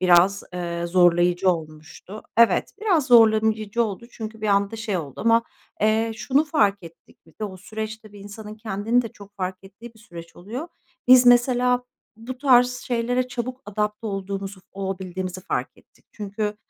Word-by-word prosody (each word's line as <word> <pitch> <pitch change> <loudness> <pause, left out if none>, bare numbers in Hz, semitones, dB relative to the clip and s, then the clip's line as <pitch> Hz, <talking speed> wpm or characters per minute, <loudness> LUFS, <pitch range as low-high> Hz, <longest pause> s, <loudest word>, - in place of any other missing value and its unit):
biraz, 185 +2 +4
eee, 170 -1 -3
zorlayıcı 175 +1 +3
olmuştu. 160 +5 -7
Evet, 235 0 +4
biraz 350 -11 +2
zorlayıcı 220 -2 +4
oldu 215 +2 -6
çünkü 220 -1 -8
bir 215 - -2
anda 200 +2 +1
şey 215 -4 -2
oldu 145 -6 -6
ama, 230 0 +4 0.4
eee, 220 +1 +2
şunu 275 +5 +1
fark 205 -11 +1
ettik 165 -1 -15
biz 160 - -23
de; - - -1
o 190 -2 -7
süreç, 220 +3 -6
tabii, 210 -2 -15
insanın 210 +1 -9
kendini 220 +2 0
de 230 - -6
çok 200 -1 -16
fark 185 -1 -3
ettiği 225 +5 -13
bir 220 - -20
süreç 170 -6 -12
oluyor. 235 - -7 0.4
Biz, 250 -1 +8
mesela, 245 0 +4 0.3
bu 250 +3 -8
tarz 250 -3 +5
şeylere 245 +1 -1
çabuk 250 +1 -5
adapte 210 +1 -3
olduğumuzu, 195 -1 -5
olabildiğimizi 185 -1 -5
fark - - -3
ettik. - - -26
Çünkü, 210 0 -4
210 Hz, 160 wpm, -23 LUFS, 190-235 Hz, 0.4 s, Biz